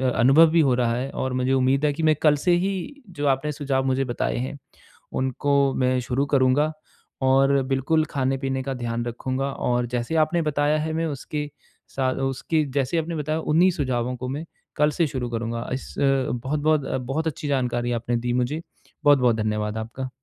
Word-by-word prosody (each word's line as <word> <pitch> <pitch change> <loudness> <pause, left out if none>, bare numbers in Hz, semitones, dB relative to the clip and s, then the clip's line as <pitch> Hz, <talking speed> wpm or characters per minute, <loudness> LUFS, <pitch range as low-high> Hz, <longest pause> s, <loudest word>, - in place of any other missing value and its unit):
अनुभव 135 +8 +6
भी 170 - +4
हो 135 -4 +3
रहा 120 -2 +1
है। 130 +3 -3
और 130 -1 -3
मुझे 130 +1 0
उम्मीद 135 +3 +2
है 145 - +3
कि 160 +2 -4
मैं 155 -1 +4
कल 150 -2 +5
से 175 +5 +1
ही 195 +9 -4
जो 145 -5 -3
आपने 140 +2 +1
सुझाव 140 -2 -1
मुझे 135 +1 +1
बताए 120 - -2
हैं 130 +3 -4 0.6
उनको 130 +2 -1 0.3
मैं 130 0 +2
शुरू 125 +3 -1
करूँगा 140 +2 +2 0.5
और 135 +1 +4
बिल्कुल 135 +4 +2
खाने-पीने 135 -1 -1
का 135 0 -3
ध्यान 120 -1 -3
रखूँगा। 130 +3 -3
और 120 0 0
जैसे 120 +7 -2
आपने 170 +2 -1
बताया 150 0 +1
है 160 0 -2
मैं 165 +1 0
उसके 150 0 -4 0.5
सा 130 -1 +1 0.2
उसकी 150 +4 -1
जैसे 140 +4 0
आपने 165 +1 -2
बताया 155 +1 -1
उन्ही 170 +4 +3
सुझावों 125 -6 -1
को 125 - -5
मैं 150 +5 -4 0.3
कल 150 0 +3
से 165 +1 +1
शुरू 125 -3 -4
करूँगा। 115 0 -3
इस 130 - -6
अ, - - +2 0.3
बहुत-बहुत 145 +4 0
अ, - - -2
बहुत 135 +6 -2
अच्छी 150 0 -4
जानकारी 120 -3 0
आपने 120 0 -1
दी 120 +1 -2
मुझे। 125 +6 -1 0.4
बहुत-बहुत 130 -5 +5
धन्यवाद 105 0 -1
आपका। 120 +4 -5
135 Hz, 185 wpm, -24 LUFS, 125-150 Hz, 0.6 s, अनुभव